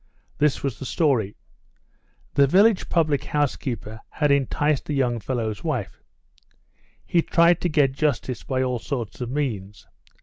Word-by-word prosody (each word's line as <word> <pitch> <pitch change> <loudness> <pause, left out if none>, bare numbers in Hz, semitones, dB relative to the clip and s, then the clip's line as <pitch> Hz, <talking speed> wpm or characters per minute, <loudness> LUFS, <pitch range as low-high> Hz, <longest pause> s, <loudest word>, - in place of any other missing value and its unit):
This 150 -1 +2
was 135 -6 -3
the - - -6
story: 125 - +1 1.0
The 140 -1 +5
village 200 +6 +4
public 155 -5 +1
house 145 -2 0
keeper 110 -4 -6
had 150 -2 0
enticed 140 +1 +1
the 150 - -2
young 125 -3 +1
fellow's 110 -2 -3
wife. - - -3 1.0
He 170 - +2
tried 170 +1 +3
to 175 - 0
get 145 -4 +3
justice 135 -4 -1
by 130 -1 -1
all 125 -2 -1
sorts 120 -1 -5
of 120 - -3
means. 110 -8 -3
135 Hz, 145 wpm, -24 LUFS, 120-150 Hz, 1.0 s, The